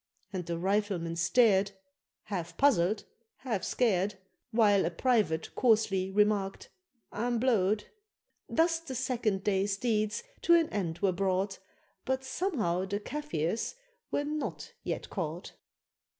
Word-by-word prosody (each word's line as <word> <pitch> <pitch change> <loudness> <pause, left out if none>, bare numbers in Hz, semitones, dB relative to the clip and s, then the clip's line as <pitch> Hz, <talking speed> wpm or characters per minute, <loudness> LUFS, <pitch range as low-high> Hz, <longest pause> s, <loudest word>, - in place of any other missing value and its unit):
And 180 -3 -4
the 170 -1 -2
Riflemen 190 -2 0
stared, 195 +2 +3 0.5
Half 175 -5 -5
puzzled, 205 -7 +3 0.3
half 230 -7 -3
scared, 205 -5 +1 0.3
While 215 -4 +4
a 165 - +1
private 180 -4 +1
coarsely 210 -6 +2
remarked, 205 -1 +1 0.4
"I'm 240 +2 -1
blowed." 215 -4 +2 0.7
Thus 330 0 +2
the 315 -6 -7
second 230 -6 0
day's 195 0 +1
deeds 215 - 0 0.2
to 340 - +6
an 330 -2 +3
end 170 -5 -2
were 195 - +4
brought, 190 +1 0 0.4
But 265 0 -1
somehow 245 - -1
the 200 +1 -2
Kafirs 225 - -2 0.3
were 285 - 0
not 300 0 -4
yet - - -3
caught. 175 -1 -4
205 Hz, 120 wpm, -30 LUFS, 185-245 Hz, 0.7 s, to